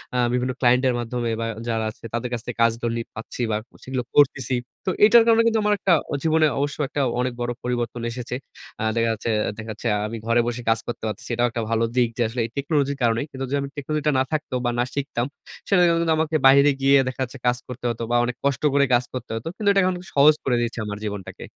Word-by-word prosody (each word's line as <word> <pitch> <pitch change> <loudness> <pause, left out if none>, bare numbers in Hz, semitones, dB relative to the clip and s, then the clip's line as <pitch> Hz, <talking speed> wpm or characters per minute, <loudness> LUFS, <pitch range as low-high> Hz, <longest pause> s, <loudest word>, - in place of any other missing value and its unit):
আ - - +1 0.2
বিভিন্ন 125 +1 0
ক্লায়েন্টের 125 0 +3
মাধ্যমে 120 0 -2
বা, - - -1 0.2
যারা 110 -1 -1
আছে - - -25
তাদের 120 +1 -2
কাছ 115 - -2
থেকে 120 - -6
কাজগুলি 115 0 +1 0.2
পাচ্ছি 115 +2 -7
বা, 105 - +1 0.3
সেগুলো 130 -1 -3
করতেছি। 130 -3 +3 0.3
তো - - 0 0.2
এটার 230 +1 +7
কারণে 230 0 +6
কিন্তু 225 -1 +2
আমার 210 0 +3
একটা 185 -3 +3 0.2
অ - - -2
জীবনে 160 0 +3
অবশ্য 145 0 -2
একটা 145 - -2 0.2
অনেক 125 0 0
বড় 120 0 -1
পরিবর্তন 120 -1 -2
এসেছে। 125 +1 -5 0.5
আ - - -1
দেখা 115 0 +2
যাচ্ছে 110 +1 -4 0.3
দেখা 110 0 -7
যাচ্ছে 110 +2 -5 0.2
আমি 115 +1 -5
ঘরে 115 +1 +3
বসে 120 0 -3
কাজ 115 0 +3
করতে 120 - -5
পারতেছি। 105 +2 -6
এটাও 120 +1 +2
একটা 115 - -3
ভালো 115 0 +1
দিক 120 -2 +3
যে - - -1
আসলে 120 +1 -3
এই - - -6
টেকনোলজির 140 -1 0
কারণেই। 115 +2 +2
কিন্তু 135 0 -5
যদি 140 - 0
আমি 140 - -4
টেকনোলজিটা 150 +1 -1
না - - +3
থাকত 155 -3 -2
বা, - - +2
না - - +4
শিখতাম, 135 -4 -2 0.4
সেটার 180 -3 +4
জন্য 170 0 +2
কিন্তু 165 -1 +2
আমাকে 160 0 0
বাইরে 140 +2 +6
গিয়ে 140 +1 +5
দেখা 130 +1 -4
যাচ্ছে 130 +2 -7
কাজ 125 0 +3
করতে 125 -1 -8
হতো 115 0 -4
বা, 120 - +2
অনেক 120 0 -3
কষ্ট 140 0 0
করে 140 0 +4
কাজ 120 - +4
করতে 125 -2 -6
হতো। 115 - -7
কিন্তু 210 -2 +1
এটা 195 -1 +4
এখন 185 0 +1 0.2
সহজ 150 +2 +7
করে 125 -2 +1
দিয়েছে 120 0 -2
আমার 105 0 -5
জীবনটাকে। 105 -3 -6
125 Hz, 235 wpm, -23 LUFS, 115-145 Hz, 0.5 s, এটার